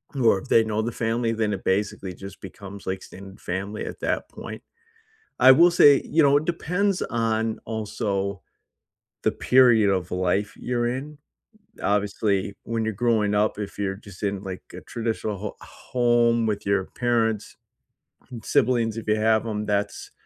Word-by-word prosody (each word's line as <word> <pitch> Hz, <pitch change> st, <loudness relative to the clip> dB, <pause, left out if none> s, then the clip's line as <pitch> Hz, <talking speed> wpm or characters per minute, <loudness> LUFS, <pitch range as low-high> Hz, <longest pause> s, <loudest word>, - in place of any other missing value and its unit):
or 115 Hz, -7 st, +3 dB
if -, -, -12 dB
they 115 Hz, -, +5 dB
know 110 Hz, 0 st, -1 dB
the 120 Hz, -, -2 dB
family, 115 Hz, 0 st, 0 dB
then 110 Hz, -2 st, 0 dB
it 95 Hz, -, -5 dB
basically 95 Hz, -1 st, -1 dB
just 95 Hz, +2 st, -10 dB
becomes 100 Hz, +1 st, -10 dB
like 95 Hz, -, -1 dB
extended 95 Hz, +1 st, -12 dB
family 100 Hz, +4 st, -4 dB
at -, -, -7 dB
that -, -, -2 dB
point. -, -, -9 dB, 0.8 s
I 130 Hz, +1 st, +9 dB
will 170 Hz, +6 st, +6 dB
say, 145 Hz, -5 st, +6 dB
you 160 Hz, 0 st, +2 dB
know, 140 Hz, 0 st, +5 dB
it 155 Hz, -, -2 dB
depends 180 Hz, +3 st, 0 dB
on 115 Hz, -1 st, -1 dB
also 100 Hz, -3 st, -3 dB, 0.8 s
the -, -, +2 dB
period 120 Hz, -5 st, +4 dB
of 90 Hz, -2 st, -1 dB
life 95 Hz, +3 st, 0 dB
you're 120 Hz, -1 st, -1 dB
in. 145 Hz, +4 st, -5 dB, 0.6 s
Obviously, 100 Hz, -1 st, 0 dB
when 115 Hz, -1 st, -2 dB
you're 110 Hz, -, -1 dB
growing 105 Hz, -2 st, +1 dB
up, 105 Hz, 0 st, +1 dB
if 105 Hz, -2 st, -6 dB
you're 95 Hz, -1 st, -2 dB
just 100 Hz, -2 st, -14 dB
in, 100 Hz, -1 st, -2 dB
like, 95 Hz, -1 st, -6 dB
a -, -, -8 dB
traditional 110 Hz, -2 st, -3 dB
ho 105 Hz, +1 st, -6 dB
home 120 Hz, -2 st, +1 dB
with 105 Hz, -2 st, -2 dB
your 100 Hz, -1 st, +2 dB
parents 115 Hz, -3 st, 0 dB, 0.8 s
and 115 Hz, -3 st, -8 dB
siblings, 115 Hz, -2 st, +1 dB
if 115 Hz, -, -6 dB
you 105 Hz, -, +3 dB
have 110 Hz, +1 st, +2 dB
'em, 105 Hz, -1 st, -3 dB
that's 100 Hz, 0 st, -2 dB
110 Hz, 165 wpm, -24 LUFS, 100-120 Hz, 0.8 s, I